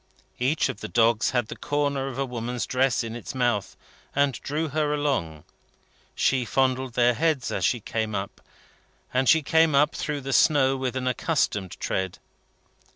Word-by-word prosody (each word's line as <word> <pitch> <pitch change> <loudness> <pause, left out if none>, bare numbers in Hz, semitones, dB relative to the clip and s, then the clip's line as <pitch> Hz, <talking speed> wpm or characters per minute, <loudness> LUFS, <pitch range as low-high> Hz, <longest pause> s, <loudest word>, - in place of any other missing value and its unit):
Each 135 +5 +1
of 100 - -5
the - - -6
dogs 115 -1 +3
had 120 -3 0
the - - -7
corner 145 -2 -1
of 135 -2 -6
a 135 - 0
woman's 120 -1 -4
dress 130 -2 +1
in 115 0 -6
its 120 - -7
mouth, 120 -6 0 0.4
and 140 -1 +3
drew 155 +2 -2
her 150 0 0
along. 90 - -2 0.7
She 130 -2 +2
fondled 130 +1 0
their 120 0 +3
heads 155 0 0
as - - -2
she 120 - +2
came 110 0 -3
up, 100 0 -5 0.7
and 130 +1 +2
she 160 -1 +5
came 160 0 +3
up 150 +2 +4
through 150 -2 -3
the 135 0 -3
snow 135 -1 +4
with 130 -1 -3
an 130 -1 -2
accustomed 125 - -1
tread. 95 -1 -2
130 Hz, 170 wpm, -25 LUFS, 120-145 Hz, 0.7 s, she